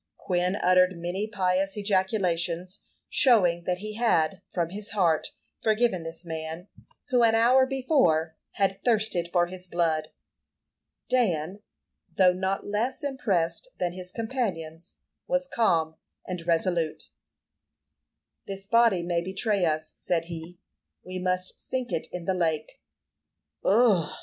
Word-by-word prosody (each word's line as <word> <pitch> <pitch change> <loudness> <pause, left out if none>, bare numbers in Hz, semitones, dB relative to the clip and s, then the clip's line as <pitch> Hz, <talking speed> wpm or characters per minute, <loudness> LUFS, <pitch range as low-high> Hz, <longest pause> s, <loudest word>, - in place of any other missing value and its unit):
Quin 180 +1 0
uttered 185 -2 +3
many 175 +5 -3
pious 195 -1 0
ejaculations, 185 -3 0 0.3
showing 180 -10 +3
that 180 -1 0
he 215 +3 -6
had, 195 -6 +2
from 170 -2 -1
his 205 +3 -6
heart, 165 -5 +2 0.3
forgiven 220 -4 +2
this 165 +2 -8
man, 160 +2 -5 0.4
who, 250 -3 +3
an 225 -1 +5
hour 255 +3 +5
before, 250 - +2 0.2
had 195 -1 0
thirsted 215 -7 +1
for 175 -1 +3
his 185 +1 -9
blood. 160 -3 0 1.0
Dan, 195 -6 0 0.5
though 185 -2 +5
not 190 +1 -2
less 235 +8 -2
impressed 215 - -1
than 175 -1 -1
his 180 0 -7
companions, 185 -9 -3 0.3
was 270 0 +1
calm 165 -11 +1 0.3
and 180 -2 -5
resolute. 170 -1 0 1.4
"This 195 0 -5
body 230 -4 +4
may 170 -1 0
betray 190 +1 0
us," 155 -1 -1
said 170 -2 -1
he. 170 +1 -8 0.5
"We 185 0 -5
must 185 0 -2
sink 255 -1 -4
it 160 - -2
in 175 -1 -6
the 190 - +1
lake." 160 -4 -2 0.8
"Ugh!" 200 -7 +4
185 Hz, 125 wpm, -27 LUFS, 170-215 Hz, 1.4 s, an